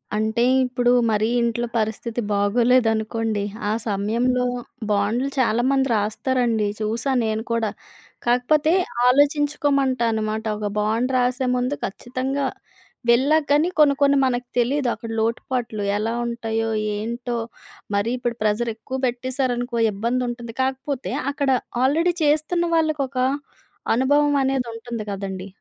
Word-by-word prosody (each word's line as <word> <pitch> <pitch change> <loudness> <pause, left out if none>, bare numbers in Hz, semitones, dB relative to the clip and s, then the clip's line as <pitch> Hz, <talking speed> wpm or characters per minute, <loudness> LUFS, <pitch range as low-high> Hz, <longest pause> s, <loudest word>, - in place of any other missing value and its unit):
అంటే 220 +2 +1 0.2
ఇప్పుడు 245 -1 +1 0.2
మరి 215 +1 +2
ఇంట్లో 235 0 0
పరిస్థితి 225 +2 -2
బాగోలేదనుకోండి 225 0 +2 0.3
ఆ - - +1 0.2
సమయంలో 235 +5 +1 0.5
బాండ్లు 210 +6 +1
చాలామంది 260 +3 +2
రాస్తారండి. 225 +1 0
చూసాను 235 +4 0
నేను 220 0 -1
కూడా. 230 -2 +1 0.6
కాకపోతే 290 +7 +3 0.3
ఆలోచించుకోమంటా 280 -2 +2
అనమాట. 220 0 -2
ఒక 210 - -2
బాండ్ 225 +5 0
రాసే 250 +1 +1
ముందు 250 +3 0
ఖచ్చితంగా 260 +6 -3 0.6
వెళ్ళా 270 +6 +5
కానీ 300 +5 +3
కొన్ని 285 -2 +6
కొన్ని 280 0 +5
మనకు 245 -1 -1
తెలియదు 260 +2 +1
అక్కడ 230 -1 -7
లోటుపాట్లు. 230 -1 -2 0.2
ఎలా 225 +2 -1
ఉంటాయో, 225 -1 -2 0.3
ఏంటో? 235 +3 -4 0.6
మరి 200 +4 +1
ఇప్పుడు 240 -1 -2
ప్రెజర్ 215 +2 +1
ఎక్కువ 260 +4 -6
పెట్టేశారనుకో 245 -1 -2
ఇబ్బంది 235 +5 -1
ఉంటుంది. 240 -1 -6
కాకపోతే 265 +1 -2 0.2
అక్కడ 280 -1 -1 0.3
ఆల్రెడీ 325 +7 +3
చేస్తున్న 310 +4 +2
వాళ్ళకి 310 -2 +1
ఒక 255 - -10 0.8
అనుభవం 285 +4 +3
అనేది 265 -2 0
ఉంటుంది 230 -1 -6
కదండీ. 195 -1 -5
245 Hz, 115 wpm, -22 LUFS, 225-265 Hz, 0.8 s, కొన్ని